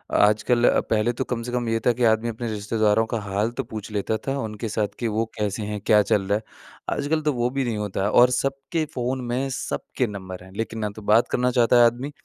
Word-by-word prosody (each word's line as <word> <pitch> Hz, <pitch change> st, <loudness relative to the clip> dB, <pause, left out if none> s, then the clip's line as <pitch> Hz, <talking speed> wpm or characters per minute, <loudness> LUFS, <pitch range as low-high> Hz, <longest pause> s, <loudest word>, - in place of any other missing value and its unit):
आजकल 110 Hz, +4 st, +3 dB
अ, -, -, +3 dB
पहले 110 Hz, +2 st, +2 dB
तो 130 Hz, -, -2 dB
कम 125 Hz, -2 st, -3 dB
से 120 Hz, -, -5 dB
कम 120 Hz, -1 st, -1 dB
ये 115 Hz, 0 st, +1 dB
था 120 Hz, -, +5 dB
कि 120 Hz, +1 st, -2 dB
आदमी 110 Hz, +2 st, 0 dB
अपने 115 Hz, +1 st, -5 dB
रिश्तेदारों 105 Hz, +1 st, +1 dB
का 115 Hz, -, 0 dB
हाल 100 Hz, +3 st, -1 dB
तो -, -, +1 dB
पूछ 110 Hz, 0 st, -6 dB
लेता 105 Hz, +1 st, -1 dB
था 135 Hz, +1 st, 0 dB
उनके 110 Hz, -2 st, -4 dB
साथ 105 Hz, 0 st, 0 dB
कि 120 Hz, -, -1 dB
वो 110 Hz, +1 st, 0 dB
कैसे 105 Hz, 0 st, -2 dB
हैं? 105 Hz, 0 st, -4 dB
क्या 105 Hz, -1 st, +6 dB
चल 105 Hz, -, +4 dB
रहा 100 Hz, +1 st, +2 dB
है? 110 Hz, -, -9 dB, 0.5 s
आजकल 150 Hz, +2 st, 0 dB
तो 150 Hz, -1 st, +1 dB
वो 120 Hz, 0 st, 0 dB
भी 135 Hz, -, +2 dB
नहीं 115 Hz, -3 st, -2 dB
होता 105 Hz, -2 st, -2 dB
है 100 Hz, -, +1 dB
और 125 Hz, +1 st, +6 dB
सबके 135 Hz, +5 st, -1 dB
फ़ोन 130 Hz, +1 st, -1 dB
में 135 Hz, +2 st, -1 dB
सबके 125 Hz, 0 st, -3 dB
नंबर 95 Hz, -3 st, -7 dB
हैं। 95 Hz, -, -14 dB
लेकिन 115 Hz, 0 st, -3 dB
ना 105 Hz, -1 st, -1 dB
तो 110 Hz, -, -9 dB
बात 115 Hz, +2 st, +5 dB
करना 125 Hz, 0 st, +1 dB
चाहता 120 Hz, -1 st, +4 dB
है 120 Hz, -, +8 dB
आदमी 125 Hz, +5 st, 0 dB
115 Hz, 250 wpm, -24 LUFS, 105-125 Hz, 0.5 s, है